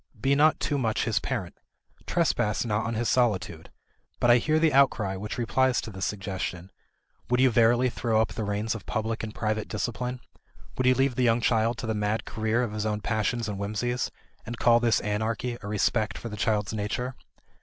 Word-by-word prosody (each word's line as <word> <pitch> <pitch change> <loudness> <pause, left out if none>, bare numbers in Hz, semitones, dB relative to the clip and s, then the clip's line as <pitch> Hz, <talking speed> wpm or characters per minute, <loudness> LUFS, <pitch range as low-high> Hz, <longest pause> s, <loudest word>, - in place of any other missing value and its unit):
Be 135 +5 +2
not 150 +2 +4
too 145 - -1
much 115 -4 0
his 115 -2 +1
parent. 105 -10 -4 0.5
Trespass 120 - +1
not 110 0 -1
on 115 - -2
his 115 +1 -1
solitude. 95 -10 0 0.5
But 120 - +4
I 120 - +6
hear 155 +6 +1
the 160 -2 +3
outcry 120 -8 +3
which 105 +3 -5
replies 125 +2 +2
to 110 - -7
this 95 -2 -3
suggestion: 95 -2 -4 0.6
Would 125 0 +2
you 130 -1 +5
verily 120 +2 +4
throw 115 -2 0
up 110 - +2
the 110 - -3
reins 105 +2 -1
of 110 -4 -8
public 110 +1 -2
and 110 -1 -6
private 110 -1 -1
discipline; 125 +3 -3 0.6
would 130 - 0
you 130 - +5
leave 135 +1 +2
the 125 - 0
young 115 -1 +3
child 115 0 +1
to - - -5
the 110 - -1
mad 105 +1 -1
career 110 +2 0
of 110 -4 -3
his 105 0 -2
own 105 0 -2
passions 110 +2 -1
and 100 -2 -4
whimsies, 110 +5 -2 0.3
and 120 +1 -6
call 120 0 +5
this 115 -2 +2
anarchy 110 +3 -2
a 100 - -7
respect 105 +1 0
for 115 - -6
the 105 - -6
child's 105 0 0
nature? 110 +5 -2
115 Hz, 200 wpm, -27 LUFS, 105-120 Hz, 0.6 s, I